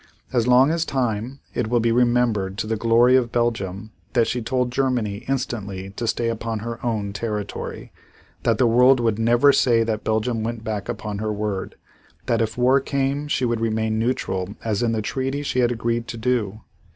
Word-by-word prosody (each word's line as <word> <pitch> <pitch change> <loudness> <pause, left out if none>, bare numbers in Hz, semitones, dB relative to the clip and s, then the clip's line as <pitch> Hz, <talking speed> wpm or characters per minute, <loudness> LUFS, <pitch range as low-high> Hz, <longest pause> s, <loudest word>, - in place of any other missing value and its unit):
As 120 -2 +2
long 130 +4 +5
as 165 0 +1
time, 125 -2 -2
it 120 - -1
will 120 +1 +2
be 115 0 +2
remembered 120 -5 +2
to - - -2
the 110 +1 -1
glory 115 +3 +4
of 120 -3 +2
Belgium 110 -3 -2 0.2
that 120 -3 +4
she 125 - -2
told 125 +1 -1
Germany 120 -6 -1
instantly 105 -8 -3
to 115 +3 -4
stay 115 +1 0
upon 115 0 -2
her 115 +2 -6
own 105 -4 -2
territory; 105 -1 -5 0.5
that 115 -2 +1
the 130 - +3
world 125 +3 +5
would 115 -2 0
never 120 +5 +5
say 115 -3 +3
that 110 -1 -2
Belgium 110 +1 0
went 115 0 -4
back 105 -3 -4
upon 105 -2 -4
her 110 0 -2
word; 105 -2 -3 0.5
that 115 -1 +1
if 115 +1 -2
war 130 +2 +4
came 140 +1 -1
she 130 -3 0
would 120 -1 0
remain 110 -1 0
neutral 105 -5 -2
as 110 0 0
in 120 -1 +1
the 110 -2 -1
treaty 135 +5 -2
she 130 - -1
had 120 -1 +3
agreed 115 0 -1
to 120 - -6
do. 110 -3 -1
115 Hz, 190 wpm, -23 LUFS, 110-125 Hz, 0.5 s, long